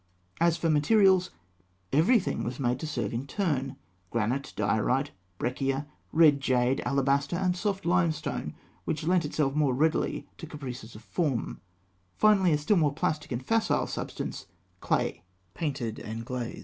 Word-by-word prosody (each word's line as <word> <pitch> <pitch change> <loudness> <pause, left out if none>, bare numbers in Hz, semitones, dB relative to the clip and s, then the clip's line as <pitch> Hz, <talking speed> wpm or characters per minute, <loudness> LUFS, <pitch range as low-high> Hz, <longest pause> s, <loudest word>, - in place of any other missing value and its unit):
As 170 0 +3
for 165 - -1
materials, 185 +4 +4 0.6
everything 190 - +3
was 120 +2 -4
made 125 -1 0
to 155 - -4
serve 120 -9 -2
in 125 +4 -3
turn 140 -7 -1 0.3
granite, 120 +6 -1
diorite, 110 +7 +1 0.3
breccia, 135 +4 -1 0.3
red 155 -4 +5
jade, 130 0 +2
alabaster, 140 +2 +1
and 180 0 +1
soft 195 +1 -2
limestone, 170 -3 0 0.3
which 160 - -2
lent 175 0 +2
itself 145 -2 0
more 145 -4 +2
readily 155 +4 0
to 165 - -7
caprices 125 -7 -8
of 110 - -11
form; 140 -4 -2 0.5
finally, 200 -4 +4
a 150 - +4
still 150 +8 +2
more 150 -4 +2
plastic 150 -1 -2
and 125 +1 -3
facile 225 -1 +2
substance - - -5 0.3
clay, 85 - 0 0.3
painted 135 -8 -3
and 115 +2 -6
glazed. 125 -1 -4
145 Hz, 145 wpm, -28 LUFS, 125-170 Hz, 0.6 s, red